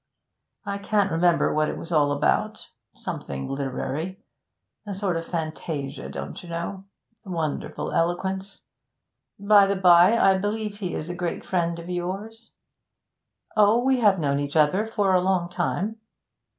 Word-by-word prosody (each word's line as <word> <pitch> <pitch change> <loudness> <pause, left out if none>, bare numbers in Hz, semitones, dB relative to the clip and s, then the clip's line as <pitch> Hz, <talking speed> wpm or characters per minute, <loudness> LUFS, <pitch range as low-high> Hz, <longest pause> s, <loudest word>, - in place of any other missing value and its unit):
I 200 0 -3
can't 200 -1 +1
remember 170 +1 +3
what 155 0 +1
it - - -4
was 165 - -8
all 145 -3 +3
about 145 - 0 0.3
something 65 -1 -5
literary. 140 +6 -3 0.7
A 200 - -4
sort 195 -2 -1
of 165 0 -4
fantasia, 155 -4 -4
don't - - -6
you 175 - -12
know. 170 +3 -5 0.4
Wonderful 165 -6 -3
eloquence. 190 +3 -1 0.7
By 200 0 +5
the 200 - +1
bye, 180 +3 +6
I 195 -3 +4
believe 210 +1 -3
he 185 -4 -3
is 160 +3 -4
a - - -5
great 175 -1 -3
friend 170 -2 0
of 170 0 -9
yours?' 195 +6 -5 1.1
'Oh, 215 +3 +5
we 265 -1 +3
have 205 -4 +4
known 140 -4 0
each 145 +1 -4
other 160 +8 +3
for 205 -4 +1
a 180 - +4
long 180 -2 +1
time.' 200 +4 -2
180 Hz, 150 wpm, -25 LUFS, 165-200 Hz, 1.1 s, bye